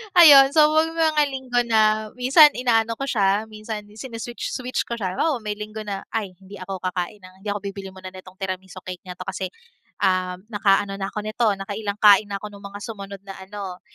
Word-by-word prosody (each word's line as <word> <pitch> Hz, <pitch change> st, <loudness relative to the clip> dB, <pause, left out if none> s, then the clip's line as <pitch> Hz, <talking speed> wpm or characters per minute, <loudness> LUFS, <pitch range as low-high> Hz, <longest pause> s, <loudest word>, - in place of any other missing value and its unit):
Ayun 285 Hz, -6 st, +9 dB
so 305 Hz, 0 st, +6 dB
may 320 Hz, +1 st, +3 dB
mga 315 Hz, -2 st, +2 dB
linggo 260 Hz, -2 st, -1 dB
na 215 Hz, -2 st, +2 dB
minsan 290 Hz, +4 st, +7 dB
inaano 230 Hz, -3 st, +1 dB
ko 275 Hz, -, -3 dB
siya, 205 Hz, -3 st, +1 dB
minsan 215 Hz, -1 st, -7 dB
sini-switch-switch 240 Hz, +3 st, -5 dB
ko 235 Hz, 0 st, -5 dB
siya, 185 Hz, -3 st, -3 dB
halimbawa 305 Hz, 0 st, +1 dB
may 210 Hz, -2 st, -4 dB
linggo 215 Hz, +1 st, -7 dB
na, 195 Hz, -1 st, -4 dB
"Ay 205 Hz, -5 st, -3 dB
hindi 195 Hz, +2 st, -13 dB
ako 185 Hz, 0 st, -6 dB
kakain 185 Hz, +2 st, -3 dB
ng 185 Hz, 0 st, -13 dB
hindi 200 Hz, -, -10 dB
ako 205 Hz, 0 st, -1 dB
bibili 195 Hz, -1 st, -6 dB
muna 185 Hz, 0 st, -9 dB
nitong 185 Hz, 0 st, -13 dB
tiramisu 185 Hz, -1 st, -6 dB
cake 185 Hz, -1 st, -7 dB
na 180 Hz, -, -7 dB
'to -, -, -7 dB
kasi, 190 Hz, -1 st, -4 dB, 0.6 s
um, 185 Hz, 0 st, 0 dB
naka-ano 195 Hz, -1 st, +1 dB
na 195 Hz, -, -2 dB
ako 210 Hz, +1 st, -5 dB
nito 215 Hz, +2 st, 0 dB
nakailang 200 Hz, +1 st, -4 dB
kain 205 Hz, 0 st, +7 dB
na 200 Hz, -, -4 dB
ako 210 Hz, -, -6 dB
nung 200 Hz, 0 st, -12 dB
mga 200 Hz, 0 st, -9 dB
sumunod 200 Hz, -3 st, -8 dB
na 195 Hz, -1 st, -9 dB
ano." 190 Hz, -1 st, -7 dB
205 Hz, 200 wpm, -23 LUFS, 195-230 Hz, 0.6 s, Ayun